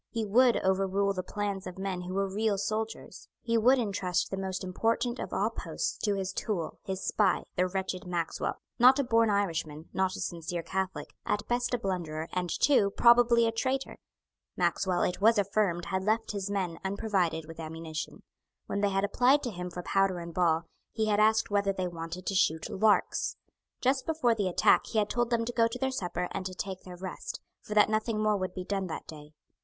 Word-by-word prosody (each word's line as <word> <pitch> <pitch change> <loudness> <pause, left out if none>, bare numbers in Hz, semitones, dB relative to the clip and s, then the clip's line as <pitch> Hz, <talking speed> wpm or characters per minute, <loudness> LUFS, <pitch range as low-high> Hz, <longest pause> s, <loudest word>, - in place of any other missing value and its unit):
He 225 -2 -2
would 240 +4 +4
overrule 195 +1 +1
the 185 - -2
plans 200 0 -4
of 185 - -8
men 190 -2 -3
who 180 +1 -5
were 195 0 +1
real 205 +1 0
soldiers. 220 +2 -4 0.2
He 230 -1 0
would 245 +4 +5
entrust 195 -6 -1
the - - -1
most 190 0 -4
important 230 +6 0
of - - -5
all - - 0
posts - - -3
to 205 -2 0
his 190 -1 -3
tool, 175 -8 -3
his 190 0 -4
spy, 205 -3 +2
the 180 +1 +2
wretched 185 -1 -3
Maxwell, 170 -2 -2 0.2
not 255 +3 +7
a 280 - +2
born 230 -3 +3
Irishman, 165 -6 -1
not 190 0 0
a - - -7
sincere 170 0 -4
Catholic, 190 +1 -3
at 210 0 -2
best 245 +1 0
a - - -1
blunderer, 170 -7 -3
and 180 -1 -1
too 255 -5 +3
probably 235 -1 +6
a 225 - +2
traitor. 260 +4 -2 0.6
Maxwell, 185 -2 +1
it 180 - -1
was 225 +2 +5
affirmed, 195 -4 +1
had 190 -1 -2
left 220 +3 0
his 200 -1 -3
men 185 -5 -2
unprovided 190 -5 0
with 165 0 -10
ammunition. 160 0 -6 0.4
When 200 - -2
they 205 - +3
had 195 0 0
applied 255 +7 +3
to 245 - -2
him 180 -2 -5
for 180 0 -7
powder 195 -1 +2
and 170 -1 -7
ball, 165 -2 +2 0.3
he 220 -1 -1
had 205 0 +2
asked 220 0 +3
whether 200 -1 +2
they 185 -1 -2
wanted 170 +1 -6
to - - -1
shoot 160 -4 +1
larks. 210 +1 +2 0.5
Just 260 +1 +1
before 315 -7 +2
the 205 -4 -1
attack 175 - +4
he 225 - -3
had 210 -1 +2
told 240 -1 0
them 230 -1 +1
to 245 - -4
go 230 -1 +4
to 230 - -5
their 265 +1 -1
supper 180 -7 -2
and 195 - -3
to 185 - -8
take 190 0 -5
their 180 -1 -10
rest, 185 0 -6 0.2
for 210 - -6
that 210 - +6
nothing 215 0 0
more 215 0 +2
would 185 -2 -3
be 185 - -4
done 195 -1 -2
that 160 - -6
day. 150 -1 -11
195 Hz, 205 wpm, -29 LUFS, 180-220 Hz, 0.6 s, not